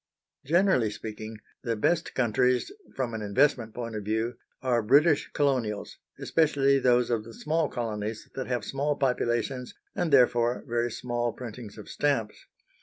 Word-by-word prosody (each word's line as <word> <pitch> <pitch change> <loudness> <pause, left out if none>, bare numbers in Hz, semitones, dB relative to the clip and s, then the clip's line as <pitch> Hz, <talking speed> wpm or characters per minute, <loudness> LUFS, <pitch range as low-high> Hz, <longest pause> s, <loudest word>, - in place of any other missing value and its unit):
Generally 170 - +3
speaking, 110 +1 -7 0.2
the 115 -3 -1
best 165 +10 0
countries 125 - +2 0.2
from 125 -3 -2
an 110 - -4
investment 115 +1 +1
point 115 -2 -5
of 105 - -4
view 110 +3 -1 0.3
are 125 -2 +2
British 145 +7 +4
Colonials, 125 -8 -1 0.2
especially 140 -4 +3
those 125 -2 +3
of 115 -2 0
the 115 0 -11
small 155 0 0
colonies 110 -2 -4
that 130 - -4
have 125 -3 -2
small 145 +2 -1
populations, 125 -1 -1 0.2
and 170 - -1
therefore 120 -2 +4
very 120 0 0
small 120 0 -2
printings 115 -3 -8
of 105 - -10
stamps. 135 -8 -1
120 Hz, 145 wpm, -28 LUFS, 110-135 Hz, 0.3 s, British